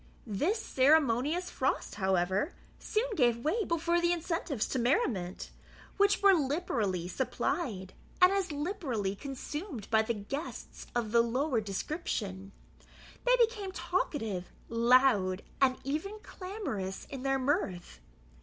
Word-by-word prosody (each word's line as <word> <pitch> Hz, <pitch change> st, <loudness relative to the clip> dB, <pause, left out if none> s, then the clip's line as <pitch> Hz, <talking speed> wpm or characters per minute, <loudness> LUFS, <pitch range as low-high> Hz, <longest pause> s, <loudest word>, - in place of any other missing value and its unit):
This 295 Hz, -, 0 dB
ceremonious 295 Hz, -, +2 dB
frost, -, -, -1 dB
however, 190 Hz, -, +1 dB, 0.3 s
soon 435 Hz, +3 st, 0 dB
gave 240 Hz, -7 st, +3 dB
way 425 Hz, +9 st, +2 dB
before 340 Hz, 0 st, +1 dB
the 345 Hz, 0 st, +3 dB
incentives 330 Hz, -, -1 dB
to 260 Hz, -, -1 dB
merriment, 230 Hz, -, 0 dB, 0.5 s
which 405 Hz, 0 st, +3 dB
were 395 Hz, -1 st, +8 dB
liberally 260 Hz, -, 0 dB
supplied, 190 Hz, -, -2 dB, 0.3 s
and 365 Hz, +1 st, +7 dB
as 390 Hz, -3 st, 0 dB
liberally 290 Hz, -, -2 dB
consumed 280 Hz, -, -6 dB
by 220 Hz, -1 st, +5 dB
the 225 Hz, +1 st, -1 dB
guests 275 Hz, +10 st, -6 dB
of 230 Hz, -3 st, -1 dB
the 235 Hz, 0 st, +6 dB
lower 250 Hz, +1 st, 0 dB
description. 200 Hz, -, -4 dB, 0.7 s
They -, -, +6 dB
became 445 Hz, -5 st, +1 dB
talkative, 225 Hz, -, -2 dB, 0.2 s
loud, 230 Hz, -5 st, +4 dB, 0.2 s
and 255 Hz, -1 st, +4 dB
even 315 Hz, +10 st, -3 dB
clamorous 365 Hz, -, -5 dB
in 270 Hz, -2 st, -5 dB
their 270 Hz, 0 st, +1 dB
mirth. 255 Hz, -, -1 dB
270 Hz, 120 wpm, -31 LUFS, 210-345 Hz, 0.7 s, were